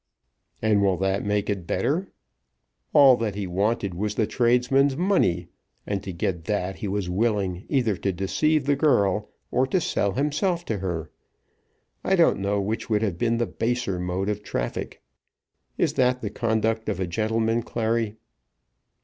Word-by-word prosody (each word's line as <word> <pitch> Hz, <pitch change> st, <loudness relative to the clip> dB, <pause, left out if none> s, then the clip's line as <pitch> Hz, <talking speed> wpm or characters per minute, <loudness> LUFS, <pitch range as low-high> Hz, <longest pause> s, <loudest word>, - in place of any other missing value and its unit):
"And 105 Hz, -2 st, +3 dB
will 95 Hz, -2 st, +2 dB
that 95 Hz, +1 st, 0 dB
make 105 Hz, 0 st, 0 dB
it 100 Hz, -5 st, -3 dB
better? 160 Hz, -, -1 dB, 0.8 s
All 140 Hz, -3 st, +7 dB
that 110 Hz, -4 st, -2 dB
he 100 Hz, -1 st, -3 dB
wanted 100 Hz, +2 st, 0 dB
was 105 Hz, +4 st, -2 dB
the 110 Hz, -, +2 dB
tradesman's 125 Hz, +4 st, +2 dB
money, 95 Hz, -, +1 dB, 0.4 s
and 100 Hz, -2 st, -2 dB
to 95 Hz, -, -6 dB
get 85 Hz, -1 st, -3 dB
that 95 Hz, -3 st, -2 dB
he 105 Hz, -, -4 dB
was 100 Hz, -1 st, -2 dB
willing 95 Hz, -2 st, 0 dB
either 120 Hz, -7 st, +1 dB
to 100 Hz, +1 st, -1 dB
deceive 135 Hz, -, +1 dB
the 145 Hz, 0 st, +3 dB
girl, 105 Hz, -, +2 dB, 0.2 s
or 130 Hz, +1 st, +2 dB
to 185 Hz, -, +1 dB
sell 100 Hz, -, 0 dB
himself 165 Hz, -, 0 dB
to 110 Hz, -3 st, -2 dB
her. 85 Hz, -4 st, -4 dB, 0.9 s
I 190 Hz, -, +2 dB
don't 170 Hz, -, +4 dB
know 100 Hz, +1 st, 0 dB
which 105 Hz, +5 st, -3 dB
would 105 Hz, -1 st, +2 dB
have 95 Hz, -6 st, -2 dB
been 115 Hz, 0 st, +1 dB
the 120 Hz, -, +1 dB
baser 115 Hz, -7 st, -2 dB
mode 90 Hz, +2 st, -2 dB
of 105 Hz, 0 st, -2 dB
traffic. -, -, -4 dB, 0.7 s
Is -, -, +1 dB
that 125 Hz, 0 st, +2 dB
the 105 Hz, -, -4 dB
conduct 110 Hz, 0 st, 0 dB
of 100 Hz, -3 st, -2 dB
a 95 Hz, -, 0 dB
gentleman, 110 Hz, +5 st, 0 dB
Clary?" 115 Hz, -1 st, -1 dB
105 Hz, 165 wpm, -25 LUFS, 95-125 Hz, 0.9 s, All